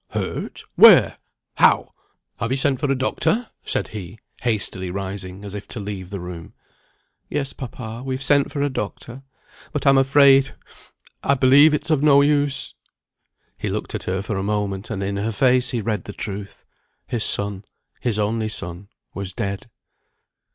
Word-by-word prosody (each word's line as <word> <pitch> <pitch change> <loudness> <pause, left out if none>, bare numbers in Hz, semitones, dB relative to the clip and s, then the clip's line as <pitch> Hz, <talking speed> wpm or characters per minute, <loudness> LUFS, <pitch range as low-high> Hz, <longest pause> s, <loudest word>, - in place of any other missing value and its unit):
"Hurt? - - -4
Where? - - +7 0.4
How? - - +4 0.4
Have 115 - -2
you 130 - 0
sent 135 -1 +1
for 145 - 0
a - - +2
doctor?" 215 - 0
said - - -2
he, 105 -1 -8 0.2
hastily 100 -5 -1
rising, 95 0 -6
as 100 - -7
if 105 -1 -7
to 120 - -7
leave 100 -3 -6
the 100 -1 -5
room. 90 -2 -8 0.8
"Yes, 140 -2 -2
papa, 120 -3 -7
we've 130 0 -3
sent 140 0 +3
for 140 -2 -2
a 145 - +1
doctor 120 +3 -6 0.5
but 150 - -3
I'm 135 -1 +6
afraid 135 0 +5 0.7
I 140 - +2
believe 135 +4 +6
it's 155 - -2
of 150 -3 +2
no 140 -2 +6
use." 145 -1 +1 0.9
He - - -2
looked - - -4
at - - -4
her 95 +1 -2
for 105 -1 -3
a - - -1
moment, 100 -1 -2
and 100 -3 -3
in 100 +1 -2
her 105 +3 -1
face 125 +3 +3
he 120 - -1
read 105 -3 -2
the 105 - -7
truth. 100 -1 -7 0.4
His 115 -3 -1
son, 100 -1 +2 0.4
his 115 -4 -1
only 110 +1 -1
son, 90 -1 -5 0.3
was 95 -2 -6
dead. 100 +3 -4
110 Hz, 165 wpm, -22 LUFS, 100-135 Hz, 0.9 s, Where